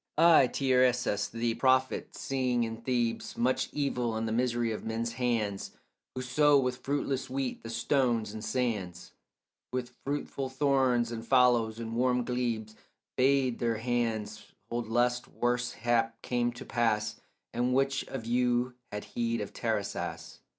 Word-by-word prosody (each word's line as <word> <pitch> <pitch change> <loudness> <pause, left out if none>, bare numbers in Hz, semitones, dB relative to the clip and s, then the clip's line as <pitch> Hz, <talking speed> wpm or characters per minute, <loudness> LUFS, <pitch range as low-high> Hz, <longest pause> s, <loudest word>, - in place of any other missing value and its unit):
I, 165 -5 +7
Tiresias 125 -6 +2
the 115 0 -1
prophet, 130 +1 +1
seeing 125 -3 0
in 115 0 -3
Thebes 120 -1 -1
Much 125 +2 +1
evil, 125 -5 -1
and 110 0 -1
the - - -2
misery 120 0 +1
of 110 - -4
men's 115 +1 -2
hands 115 -5 -1 0.4
Who 130 - -3
sow 145 +3 +4
with 125 -2 0
fruitless 135 -2 -1
wheat 130 -1 -3
the 115 - -8
stones 115 -2 +1
and 110 -1 -6
sands, 105 -10 -2 0.6
With 125 -1 -4
fruitful 140 -1 -3
thorns 130 -3 +2
the 115 -1 -5
fallows 120 -2 +3
and 115 0 -5
warm 125 0 +2
glebes, 115 -3 -2 0.4
Bade 130 -2 +2
their 115 -2 0
hands 115 -3 -2 0.3
hold 120 -1 -2
lest 120 +1 +1
worse 120 0 -1
hap 115 -1 0
came 120 -1 0
to - - -9
pass; 110 -2 0 0.3
But 120 - -1
which 135 +2 +1
of 125 -4 -6
you 125 +1 +1 0.2
had 105 0 -4
heed 115 -1 -2
of 105 - -5
Tiresias? 85 -7 -3
120 Hz, 145 wpm, -30 LUFS, 115-130 Hz, 0.6 s, I